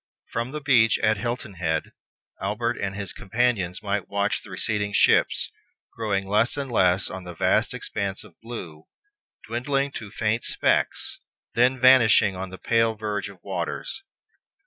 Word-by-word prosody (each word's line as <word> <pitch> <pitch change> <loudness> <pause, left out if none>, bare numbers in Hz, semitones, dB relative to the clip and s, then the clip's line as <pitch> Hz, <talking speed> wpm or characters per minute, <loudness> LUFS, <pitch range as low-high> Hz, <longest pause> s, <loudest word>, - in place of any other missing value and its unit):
From 115 +2 -2
the 150 +2 -5
beach 120 -6 +4
at 110 0 +3
Hilton 120 -1 -4
Head, 80 -3 -2 0.5
Albert - - -1
and 100 -1 -3
his 100 -3 -2
companions 100 -3 -1
might 100 -2 -2
watch 100 +1 0
the - - -14
receding 105 +2 -1
ships, - - +3 0.4
growing 100 -4 -1
less 110 +7 +2
and 140 -3 -3
less 95 -4 +3
on 95 - -6
the 90 -1 -8
vast - - +2
expanse 100 -1 -3
of 105 -5 -16
blue, 90 -10 -8 0.6
dwindling 135 +5 -1
to 110 -5 -7
faint 110 +3 -1
specks, - - +1 0.3
then 125 +2 +3
vanishing 120 -6 +6
on 95 +1 -5
the 95 - -9
pale 115 +1 +2
verge 105 -1 -3
of 95 -3 -15
the - - -17
waters. 90 -4 -3
105 Hz, 155 wpm, -25 LUFS, 95-120 Hz, 0.6 s, vanishing